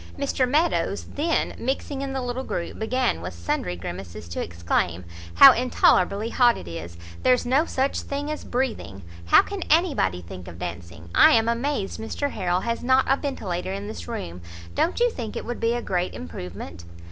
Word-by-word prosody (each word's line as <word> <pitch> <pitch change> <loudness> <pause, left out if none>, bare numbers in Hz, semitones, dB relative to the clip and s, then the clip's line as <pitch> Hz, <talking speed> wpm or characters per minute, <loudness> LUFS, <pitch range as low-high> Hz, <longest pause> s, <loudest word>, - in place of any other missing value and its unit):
Mr 275 -2 0
Meadows 315 +6 +1
then, 320 +3 0
mixing 270 +2 -2
in 275 -1 -3
the 265 -1 -2
little 250 +1 -3
group, 170 - -4
began, 220 - 0
with 85 0 -6
sundry 85 +1 -2
grimaces, 85 -1 -7
to 85 - -4
exclaim 85 +1 -1 0.3
"how - - +11
intolerably 220 -3 +2
hot 245 -2 +4
it 85 - -9
is! 85 0 -7 0.2
there's 250 -1 +3
no 270 +6 +3
such 270 -2 -1
thing 285 +2 -4
as 305 - -5
breathing. 225 - -3 0.2
How - - +7
can 405 -2 -6
anybody 285 - +2
think 90 +1 -10
of 85 - -9
dancing! 85 -1 -7
I - - +7
am 225 0 +4
amazed 235 -3 -1
Mr 275 +6 -3
Harrel 180 0 0
has 230 0 -2
not 260 +1 +4
a 270 - +4
ventilator 190 - -3
in 200 +1 -5
this 215 - -7
room. 90 - -5 0.3
Don't 345 - 0
you 485 0 +3
think 230 - -6
it - - -4
would 240 0 -4
be 230 +1 +1
a 240 - -3
great 180 -1 -1
improvement?" 85 +1 -8
225 Hz, 180 wpm, -24 LUFS, -, 0.3 s, how